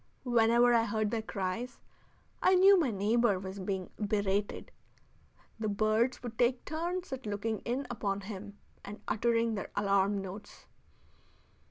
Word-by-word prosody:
Whenever 240 0 +4
I 230 -1 +4
heard 215 -1 -1
their 230 - -1
cries, 215 +4 -4 0.6
I 375 - +5
knew 385 +2 +7
my 330 -8 +2
neighbor 215 +1 +2
was 190 +1 -7
being 190 -1 -3
berated. 205 -1 -1 0.9
The 220 - -1
birds 215 +5 +1
would 230 -2 -7
take 245 +1 +2
turns 345 +1 -3
at 260 -4 -6
looking 210 +1 -2
in 255 +4 -1
upon 200 -5 -2
him 200 0 -8 0.3
and 205 +1 -8
uttering 230 0 +1
their 200 - -4
alarm 200 0 +2
notes. 195 +2 -9
220 Hz, 140 wpm, -31 LUFS, 200-240 Hz, 0.9 s, knew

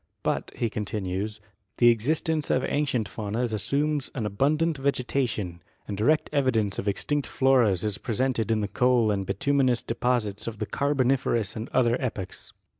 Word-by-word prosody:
But, - - -1
he 120 - 0
continues, 105 -1 -3 0.4
the 120 - +6
existence 155 +7 +1
of 130 - +2
ancient 135 -8 0
faunas 110 +3 -3
assumes 140 +7 0
an 115 -5 -2
abundant 150 - +1
vegeta 135 -1 0
tion, 90 -6 -5 0.3
and 105 - -3
direct 150 +10 +2
evidence 115 -8 +1
of 100 - -4
extinct 145 +8 -1
floras 120 -9 +3
is 105 -2 -1
presented 120 -1 0
in 110 -1 +2
i^t 100 -1 -5
coal 125 -3 +3
and 100 -2 -2
bituminous 130 +1 +1
deposits 115 -4 -1
of 115 -2 -4
the - - -2
Carboniferous 130 -6 +1
and 110 +3 -5
other 120 -1 +2
epochs. 105 -7 -5
120 Hz, 155 wpm, -26 LUFS, 105-135 Hz, 0.4 s, the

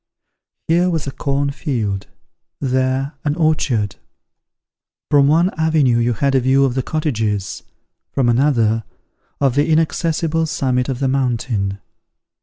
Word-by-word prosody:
Here 175 +3 +3
was 165 -4 -1
a 135 - -4
corn 140 +1 -1
field; 110 - -3 0.5
there, 130 +1 0
an 145 -1 0
orchard; 150 - 0 1.1
from 140 -2 +5
one 170 +5 +3
avenue 155 -7 +3
you 120 +1 +1
had 135 +6 0
a 135 - +4
view 135 +2 +3
of 130 - 0
the 130 - 0
cottages; 115 -10 -2 0.5
from 130 -3 +1
another, 115 -3 +2 0.6
of 135 -3 +2
the 145 +4 +1
inaccessible 160 +1 +1
summit 130 -5 0
of 130 0 -3
the 135 - +2
mountain. 115 -7 -1
135 Hz, 130 wpm, -19 LUFS, 120-155 Hz, 1.1 s, from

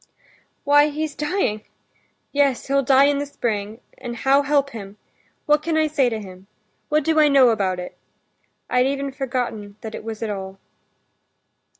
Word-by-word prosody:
"Why, 290 +1 +5
he's 300 0 -3
dying—yes, 285 - -3
he'll 275 0 +2
die 270 +1 +5
in 285 0 +3
the 285 - -3
spring, 220 -4 -3 0.2
and 240 -2 -6
how 270 +4 +3
help 280 -1 +1
him? 205 -3 -9 0.5
What 300 0 +3
can 320 0 -1
I 315 - +3
say 285 -4 +2
to 225 -2 -3
him? 190 -2 -12 0.4
What 305 0 +2
do 320 +1 +2
I 305 - +6
know 275 -3 +6
about 195 -5 0
it? 180 - -7 0.7
I'd 250 +1 +2
even 275 0 -2
forgotten 245 -6 -4
that 220 -1 -7
it - - -7
was 225 0 -6
at 220 - -2
all." 190 -1 -6
270 Hz, 165 wpm, -22 LUFS, 215-285 Hz, 0.7 s, I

